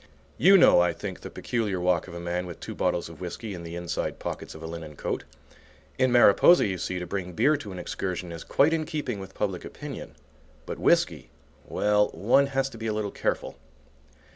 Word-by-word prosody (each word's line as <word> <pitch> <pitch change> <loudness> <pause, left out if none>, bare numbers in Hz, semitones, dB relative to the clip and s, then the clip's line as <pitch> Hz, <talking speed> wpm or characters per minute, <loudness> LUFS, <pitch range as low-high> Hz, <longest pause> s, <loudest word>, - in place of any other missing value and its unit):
You 195 +1 +8
know, 175 - +7
I 90 -1 +2
think, - - -6
the - - -8
peculiar 105 -6 -2
walk 90 -1 +1
of 85 - -9
a - - -5
man 90 +1 -3
with 85 - -8
two - - -6
bottles 85 - 0
of 80 0 -12
whiskey 100 +4 -5
in 90 - -7
the 85 0 -7
inside 85 -1 -3
pockets - - -6
of 80 - -10
a - - -5
linen 80 -2 -7
coat. - - -3 0.7
In 130 -1 +3
Mariposa, 120 - +6
you 95 -3 -2
see, 90 - -3
to 90 - -4
bring 90 0 -4
beer 135 - +3
to 105 -8 -8
an 90 - -7
excursion 90 0 -4
is 85 -1 -7
quite 150 +4 +3
in 155 -2 -1
keeping 145 -9 -3
with 95 0 -10
public 95 -4 -2
opinion. - - -8 0.5
But, - - -6
whiskey, - - +2 0.4
well, 105 0 +2
one 135 +7 +3
has 135 -1 0
to 115 - -11
be 115 - -3
a 110 - 0
little 105 -1 -2
careful. - - -2
95 Hz, 210 wpm, -27 LUFS, 85-120 Hz, 0.7 s, You